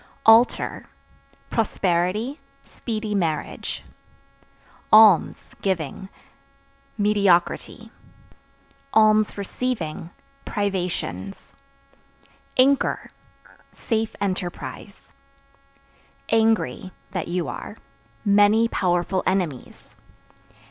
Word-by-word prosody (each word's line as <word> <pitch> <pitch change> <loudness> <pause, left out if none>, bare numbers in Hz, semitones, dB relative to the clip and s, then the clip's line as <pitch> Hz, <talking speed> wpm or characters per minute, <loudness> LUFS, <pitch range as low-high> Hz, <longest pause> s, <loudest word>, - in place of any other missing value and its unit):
Altar 225 +2 +4 0.6
Prosperity, 205 - 0 0.2
speedy 215 -2 -5
marriage. 165 -6 -3 1.1
Alms 215 -5 +5
(Giving) 190 0 -3 0.9
mediocrity; 200 -4 +1 1.0
(receiving) 215 -4 +1 0.3
privations. 180 - -4 1.0
Anchor 270 +1 +2 0.6
Safe 225 -2 -2
enterprise. 185 -3 -5 1.2
Angry 225 -4 +1 0.2
(That 180 -3 -3
you 175 0 -2
are) 210 - -7 0.5
many 205 +3 +4
powerful 180 -2 0
enemies. 180 -9 -3
200 Hz, 55 wpm, -23 LUFS, 175-220 Hz, 1.2 s, Alms